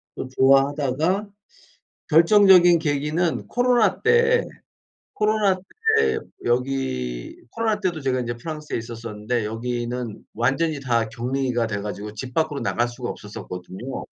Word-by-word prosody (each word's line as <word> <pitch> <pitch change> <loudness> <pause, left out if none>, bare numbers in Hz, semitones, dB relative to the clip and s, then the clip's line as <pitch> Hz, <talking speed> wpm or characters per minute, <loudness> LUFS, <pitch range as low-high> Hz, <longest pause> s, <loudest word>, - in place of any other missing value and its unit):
또 - - -5
좋아하다가 140 +8 +2 0.8
결정적인 175 +1 +6
계기는 155 +2 -1
코로나 245 -5 +2
때 470 +1 +3 0.7
코로나 210 -2 +2
때 445 - 0 0.3
여기 120 - -2
코로나 220 - -1
때도 175 -5 -1
제가 130 -2 0
인제 120 -1 -3
프랑스에 150 +4 -5
있었었는데 115 0 -4
여기는 120 +1 -4
완전히 140 +7 0
다 120 -4 0
격리가 125 0 -1
돼 105 -2 -3
가지고 105 +1 -6
집 125 +4 -7
밖으로 155 -1 0
나갈 120 - 0
수가 120 0 -6
없었었거든요. 100 +4 -7
135 Hz, 290 characters per minute, -23 LUFS, 120-180 Hz, 0.8 s, 결정적인